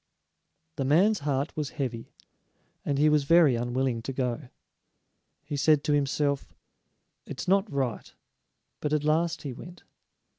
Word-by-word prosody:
The 140 - -1
man's 180 +11 +3
heart 140 +1 -2
was 150 -3 -2
heavy, 120 -5 -4 0.7
and 140 - -1
he 150 +2 +4
was 150 -2 +3
very 165 -4 +5
unwilling 120 0 -1
to 130 - -5
go. 125 0 -3 1.0
He 145 0 -4
said 145 +1 +3
to 150 - +1
himself: 140 0 0 0.7
"It's - - -6
not 195 +2 +2
right." 130 -5 -2 0.7
But 150 0 -2
at 150 -1 +1
last 160 +3 +1
he 140 -4 -5
went. 175 +7 -12
145 Hz, 140 wpm, -27 LUFS, 135-155 Hz, 1.0 s, very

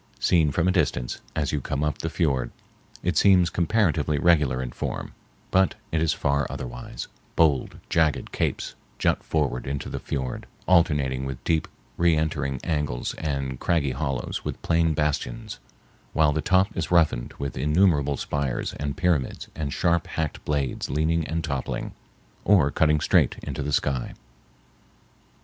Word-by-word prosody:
Seen 80 -4 +3
from 85 +4 +1
a - - +4
distance, 70 -9 0
as 75 -3 0
you 75 - -1
come 70 +3 -2
up 75 -2 -1
the 80 - -2
fiord, 75 -7 0 0.5
it - - 0
seems 90 -4 +5
comparatively 85 -5 +1
regular 75 -5 +3
in 65 -1 -3
form, - - -4 0.4
but 95 0 +3 0.2
it 80 - +1
is 80 - +3
far 70 0 0
otherwise; - - -6 0.3
bold, 75 -5 +2
jagged 80 -4 +1
capes - - -2 0.2
jut - - +1
forward 70 -6 -1
into 70 0 -3
the - - -4
fiord, 65 -3 -4 0.2
alternating 75 -7 +3
with 65 -1 -5
deep 80 -1 +1 0.3
reentering 75 -5 +1
angles 75 -7 -1
and 70 -4 -2
craggy 80 -6 +1
hollows 65 -2 -3
with - - -4
plain 80 -1 +2
bastions, 75 - -2 0.5
while 80 -2 +4
the 80 - 0
top 95 +4 +2
is - - -2
roughened 80 -8 +2
with 70 -2 -4
innumerable 75 0 +2
spires 70 -4 -2
and 70 -1 -4
pyramids 85 -8 0
and 75 -3 -3
sharp 85 +2 +1
hacked 80 -2 -3
blades 70 -3 -1
leaning 80 +3 +1
and 80 +2 -2
toppling 70 -3 -3 0.5
or 85 -9 +4
cutting 75 0 +3
straight - - +3
into - - -4
the 75 +1 -2
sky. 70 -3 0
75 Hz, 150 wpm, -25 LUFS, 70-80 Hz, 0.5 s, seems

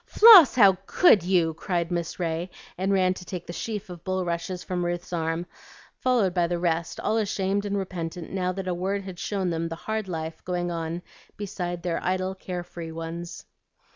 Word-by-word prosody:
"Floss, 420 - +9
how 195 -6 +6
could 285 - +6
you!" 175 -2 +2
cried 170 +1 -2
Miss 170 0 -3
Ray, 170 +1 -2 0.3
and 190 +2 -1
ran 185 -1 +3
to 185 - -10
take 180 -1 -6
the 175 - -7
sheaf 215 +2 -4
of 175 -2 -10
bulrushes 180 -1 -2
from 180 -1 -2
Ruth's 175 +1 -3
arms, 165 0 -1 0.5
followed 235 -8 +2
by 175 -1 +2
the 175 0 -1
rest, 170 -1 -1
all 220 - 0
ashamed 200 -1 0
and 200 0 -1
repentant 175 -3 -5
now 185 -1 -1
that 190 0 -5
a 180 - 0
word 195 +3 -2
had 185 -2 -8
shown 190 -3 -1
them 165 0 -2
the 165 - -4
hard 220 +4 -3
life 160 -2 -5
going 175 -1 -2
on 165 +1 -4 0.3
beside 175 -4 -4
their 175 -2 -2
idle, 185 +1 0
care 180 -2 -5
free 170 -2 -8
ones. 165 +1 -6
180 Hz, 190 wpm, -26 LUFS, 170-190 Hz, 0.5 s, Floss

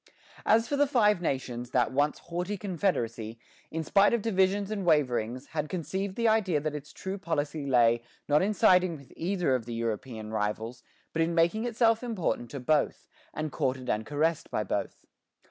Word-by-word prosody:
As 225 +1 +4
for 285 - -1
the 290 0 +4
Five 210 -8 +3
Nations, 125 -6 -2
that 125 -2 +2
once 145 +3 +1
haughty 180 +4 -4
confederacy, 120 - -2 0.3
in 160 0 -3
spite 200 +7 +4
of 225 - -3
divisions 195 -1 +1
and 205 -2 -2
waverings, 130 -6 +1
had 150 -1 -2
conceived 185 +4 -3
the 235 -1 +1
idea 205 -8 +3
that 155 +1 -3
its 145 -1 -7
true 190 +1 -5
policy 150 -4 -2
lay, 120 -3 +4 0.3
not 150 +1 +4
in 205 +3 0
siding 180 -3 +4
with 140 -2 -16
either 175 -4 0
of 125 -3 -1
the 120 - -4
European 115 -1 -4
rivals, 110 +3 -2 0.3
but 165 - 0
in 165 +1 +1
making 170 +7 +2
itself 230 -1 +2
important 200 - -2
to 140 - -6
both, 145 +4 0 0.2
and 155 -1 -4
courted 130 -1 -1
and 110 +1 -2
caressed 155 +2 0
by - - -1
both. - - -3
160 Hz, 180 wpm, -29 LUFS, 130-195 Hz, 0.3 s, As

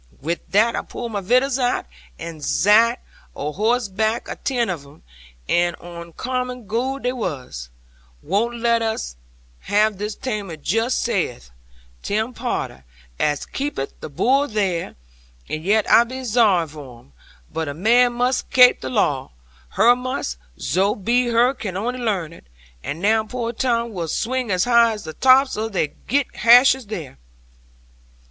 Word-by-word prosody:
'Wi' 165 +5 -2
that 220 +4 +3
I - - -1
pulled 235 -1 -7
my 205 -2 -2
vittles 255 +6 +2
out, 245 -1 0 0.3
and 160 -3 -8
zat 225 - +4 0.4
a 150 +1 -3
horsebarck, 220 +2 0
atin' 245 -4 -1
of 170 -6 -4
'em, 140 +1 -18 0.4
and 175 0 +2
oncommon 245 +9 -5
good 255 +6 -2
they 250 0 0
was. 130 - -5 0.5
"Won't 230 +7 -1
us 225 - 0 0.4
have 210 - +2
'un - - -16
this 210 +1 -3
taime 205 -10 -5
just," 225 +3 0
saith - - -2 0.5
Tim 220 +4 -2
Potter, 235 - -4 0.4
as 145 -2 0
keepeth 270 - -4
the - - -7
bull 270 - +2
there; 195 -7 -2 0.5
"and 155 0 -4
yet 210 +4 +2
I 235 - +7
be 255 +2 -7
zorry 210 -8 +3
for 145 -5 -11
'un. 70 - -26 0.4
But 160 -1 -2
a 140 - -5
man 240 +7 +4
must 250 +2 0
kape 250 -1 +6
the 130 - -4
law, 130 +1 0 0.5
her 240 +1 +6
must; 250 - -4 0.2
zo 190 +9 +1
be 240 +5 +1
her 240 +2 +3
can 200 -8 -5
only 245 +5 -3
learn 195 -9 -2
it. - - -17 0.4
And 160 +4 -5
now 220 +1 +3
poor 235 0 -4
Tom 235 -1 -1
will 170 -4 -3
swing 250 +7 -2
as 185 -1 +2
high 235 -1 +4
as 210 - -8
the 160 - -7
tops 265 - +4
of 220 0 -3
they 160 -5 0
girt 275 - -2
hashes 250 +1 +6
there." 160 - -7
220 Hz, 155 wpm, -21 LUFS, 170-245 Hz, 0.5 s, I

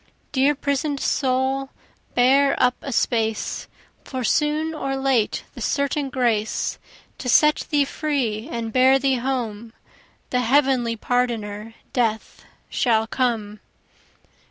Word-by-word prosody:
Dear 280 +1 +3
prison'd 280 +1 -1
soul 265 0 0 0.5
bear 270 +3 +4
up 250 0 +4
a 275 - -5
space, 225 -2 -1 0.4
For 260 -2 -5
soon 305 +5 +1
or 275 -3 -3
late 270 -5 +1
the - - -10
certain 280 0 0
grace; 235 -5 0 0.4
To 250 - -4
set 300 +4 +4
thee 290 -2 +3
free 265 -7 -2
and 230 -5 -4
bear 260 +1 +5
thee 270 -1 +1
home, 235 -3 -3 0.6
The 250 - +2
heavenly 255 -2 +2
pardoner 225 -2 -2 0.2
death 225 -3 -1 0.2
shall 225 -3 +1
come. 225 -4 -2
255 Hz, 115 wpm, -23 LUFS, 230-275 Hz, 0.6 s, bear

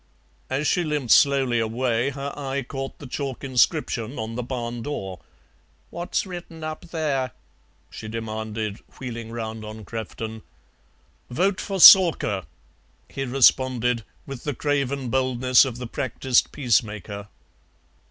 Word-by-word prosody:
As 135 +3 -1
she 175 - +2
limped 150 -6 -1
slowly 135 -4 +4
away 115 +2 0
her 140 0 -5
eye 140 -1 -3
caught 135 +2 -6
the - - -11
chalk 135 0 -5
inscription 130 -2 +1
on 110 +1 -4
the 125 - -3
barn 120 -1 -4
door. 95 -9 -5 0.7
"What's 175 +3 -2
written 175 -3 -8
up 155 +2 -5
there?" 150 -6 -2 0.6
she 110 - -8
demanded, 110 -1 -4 0.2
wheeling 115 -3 -6
round 110 -1 -5
on 110 0 -8
Crefton. 110 0 -6 0.9
"Vote 185 +9 0
for 195 -1 -3
Soarker," 165 - +8 0.6
he 135 - -4
responded, 125 -2 +3 0.2
with 135 -3 -8
the 145 -3 -3
craven 140 -2 -1
boldness 130 0 +4
of 125 -3 -5
the 125 - -6
practised 125 +1 0
peacemaker. 105 -5 -1
125 Hz, 125 wpm, -24 LUFS, 115-140 Hz, 0.9 s, Soarker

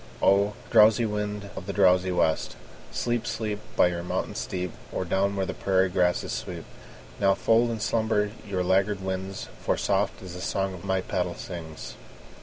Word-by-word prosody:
O! 100 +1 +4 0.2
drowsy 110 +1 +6
wind 105 -1 -3
of 90 - -7
the 100 - -2
drowsy 95 -2 +4
west, 80 -8 +1 0.4
Sleep, 120 - -1
sleep, 105 -2 -2 0.2
By 90 - +5
your 85 -1 -3
mountain 90 - -2
steep, 90 -2 -3 0.2
Or 95 - -2
down 100 +3 +1
where 95 -1 0
the - - -3
prairie 95 -1 +2
grasses 90 -1 +1
sweep! - - -5 0.5
Now 95 -1 +4
fold 115 +1 +3
in 115 -1 -3
slumber 110 -1 +1
your 95 -4 -2
laggard 95 +2 +2
wings, 95 0 -4 0.2
For - - +1
soft - - 0
is 90 -2 -8
the 90 - -7
song 95 -2 -2
my 95 0 0
paddle 90 -1 -2
sings. 80 -4 -7
95 Hz, 170 wpm, -27 LUFS, 90-105 Hz, 0.5 s, drowsy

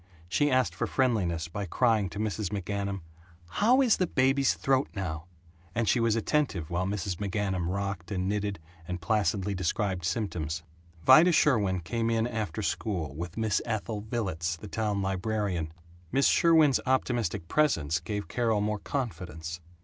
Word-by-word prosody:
She 145 +11 +2
asked 130 -1 +2
for - - -2
friendliness 95 - 0
by 100 +4 -4
crying 110 -1 +2
to 100 - -9
Mrs. 105 -1 -1
McGanum, 100 0 -3 0.5
"How 245 - +4
is 240 -4 +4
the 185 - +1
baby's 135 0 +2
throat 135 0 +1
now?" 80 -4 -4 0.5
and 115 0 0
she 125 - +3
was 115 -1 +2
attentive 115 - 0
while 90 +2 0
Mrs. 100 -2 -2
McGanum 95 -3 -1
rocked 100 -3 -3
and 95 -3 -2
knitted 100 0 -1 0.3
and 90 0 -3
placidly 100 0 0
described 95 0 -1
symptoms. 85 -4 -2 0.4
Vida 155 +7 +8
Sherwin 105 - +3
came 115 +8 -1
in 115 -1 +1
after 110 -5 -3
school, 90 - -2
with 85 +5 -6
Miss 110 -3 +1
Ethel 110 -2 -3
Villets, 95 -7 -2
the 105 - -9
town 105 -1 -1
librarian. 95 -4 -1 0.4
Miss 135 0 +3
Sherwin's 160 -5 +5
optimistic 120 -8 0
presence 80 - +2
gave 105 +5 -4
Carol 115 -3 +1
more 105 0 -1
confidence. 90 - -4
105 Hz, 150 wpm, -29 LUFS, 90-115 Hz, 0.5 s, Vida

